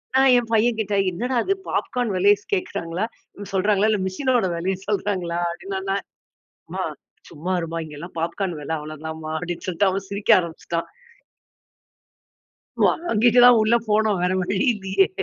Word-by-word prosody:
நான் 265 -1 +6
என் 240 - 0
பையன்கிட்ட, 220 -2 +1 0.2
"என்னடா 245 +9 -3
இது 390 - +1
பாப்கார்ன் 245 -3 -1
விலையை 200 +3 +5
ஸ் - - -25
கேக்குறாங்களா 205 - -2 0.5
சொல்றாங்களா, 205 +2 +2
இல்ல 210 -2 +1
மிஷினோட 245 +4 +1
விலைய 185 +3 -1
சொல்றாங்களா?" 190 -5 -1
அப்டின்ன 190 +2 -5
நா 195 - +1 0.8
"மா - - -2 0.5
சும்மா 170 +4 -4
இரும்மா 165 0 -4
இங்கலாம் 155 +3 -9
பாப்கார்ன் 170 +1 -2
விலை 160 +2 -3
அவ்வளவு 155 0 -8
தான்ம்மா" 160 0 -6
அப்படின்னு 175 0 -5
சொல்ட்டு 185 +2 +2
அவன் 195 +1 -3
சிரிக்க 200 +1 -2
ஆரம்பிச்சுட்டான். 170 -1 -4 2.0
வாங்கிட்டு 240 -7 +3
தான் 245 -1 +8
உள்ள 220 +2 +3
போனோம் 210 -2 +2
வேற 180 - +2
வழி 190 +2 -1 0.2
இல்லையே! 195 -1 +1
195 Hz, 140 wpm, -23 LUFS, 170-220 Hz, 2.0 s, தான்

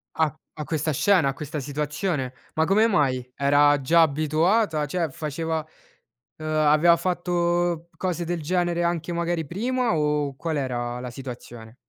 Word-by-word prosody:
A 155 -3 +1 0.2
a 150 - -5
questa 155 0 -1
scena, 175 0 +3
a - - 0
questa 150 +2 -6
situazione, 145 0 -2 0.2
ma 160 0 +2
come 210 +5 +4
mai? 130 - 0
Era 145 +1 +4
già 165 +5 +4
abituata, 155 +3 +2
cioè 165 +3 -1
faceva 155 +2 -3 0.7
uhm, 155 - -8
aveva 155 +2 +4
fatto 175 -1 0
cose 175 -2 -2
del 170 -1 -2
genere 175 +1 0
anche 170 0 -1
magari 170 -2 -1
prima, 240 - 0
o 150 -2 0
qual 160 +1 -3
era 120 -2 -3
la 125 - -5
situazione? 120 -3 -9
155 Hz, 145 wpm, -24 LUFS, 145-175 Hz, 0.7 s, come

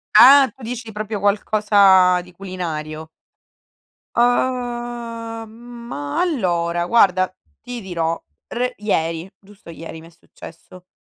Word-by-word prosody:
Ah, 270 +1 +9
tu - - -20
dici 230 -1 -6
proprio 215 0 -4
qualcosa 200 -3 +4
di 180 0 -16
culinario. 160 -5 -6 1.1
Uhm, 240 -2 -1 0.4
ma 145 -9 -4
allora, 175 - 0
guarda, 185 -3 +3 0.3
ti 245 0 -7
dirò 170 -4 -3 0.3
re 250 +1 -2
ieri, 165 -3 -2
giusto 200 -3 -17
ieri 165 -1 -9
mi 165 - -14
è - - -16
successo. 170 +2 -15
200 Hz, 110 wpm, -20 LUFS, 170-235 Hz, 1.1 s, Ah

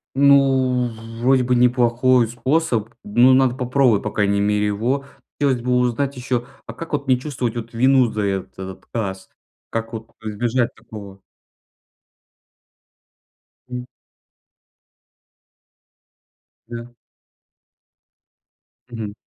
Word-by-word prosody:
Ну, 135 -3 +4 0.3
вроде 130 +1 +4
бы 125 0 +1
неплохой 125 0 +3
способ, 125 -2 0
ну, 120 +5 +4
надо 130 -1 +4
попробовать, 125 -4 +2
по 105 - -3
крайней 100 -1 +1
мере, 105 0 +1
его. 120 +7 -1 0.3
Хотелось 130 -4 +1
бы 125 - -1
узнать 125 +3 0
ещё, 125 -1 -2 0.2
а 115 - -8
как 165 +7 -8
вот 145 -2 -2
не 130 -1 +4
чувствовать 125 -4 -3
вот 115 0 -6
вину 130 0 +3
за 105 - -2
этот 95 -1 -4
отказ? 95 -5 -5 0.4
Как 115 +1 -4
вот 110 0 -7
избежать 115 +3 -1
такого? 100 -4 -11 2.5
М. 125 0 -5 2.8
Да. 120 0 -8 2.0
Мгм. 110 -3 -5
120 Hz, 105 wpm, -21 LUFS, 110-130 Hz, 2.8 s, Ну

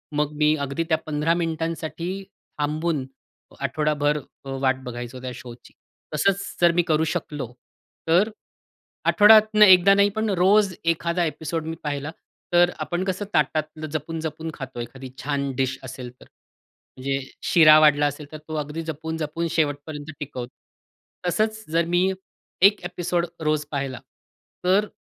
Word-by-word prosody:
मग 150 0 +1
मी 150 0 +4
अगदी 140 +4 -2
त्या 160 - +3
15 155 +2 +1
मिनिटांसाठी 165 0 -3 0.5
थांबून 150 -1 -1 0.5
आठवडाभर 150 +1 0 0.3
अ, 135 - -7
वाट 130 -1 +1
बघायचो 120 +1 -7
त्या 130 0 -5
शोची. 120 0 -12 0.4
तसंच 195 +6 +2 0.2
जर 175 -1 +6
मी 175 +1 +3
करू 155 0 +2
शकलो, 135 -5 -5 0.5
तर 180 +7 +4
अ, - - -13 0.8
आठवड्यातनं 215 0 +7
एकदा 190 0 +7
नाही, 200 0 +4
पण 220 +2 -2
रोज 195 +1 +4
एखादा 170 +1 +1
एपिसोड 160 0 -3
मी 165 - -3
पाहिला, 145 0 -3 0.4
तर 175 0 +6
अ, - - -8
आपण 175 +1 -2
कसं 190 +2 -2
ताटातलं 155 +2 0
जपून-जपून 160 +1 -4
खातो, 135 -4 -8
एखादी 130 +3 -8
छान 140 -1 -1
डिश 130 0 0
असेल 130 -1 -7
तर. - - -13 0.7
म्हणजे 135 +1 -1 0.2
शिरा 155 -2 +7
वाढला 150 -1 +5
असेल 145 +1 -7
तर 155 - -7
तो 155 - -5
अगदी 150 +2 -3
जपून-जपून 160 +1 -3
शेवटपर्यंत 150 -1 -2
टिकवतो. 130 -4 -6 0.8
तसंच 215 +4 0
जर 165 +1 +2
मी 185 +2 +3 0.5
एक 200 +2 +6
एपिसोड 175 -1 -1 0.2
रोज 155 -1 +1
पाहिला 135 -4 -3 0.7
तर 195 +3 +3
155 Hz, 140 wpm, -24 LUFS, 145-175 Hz, 0.8 s, आठवड्यातनं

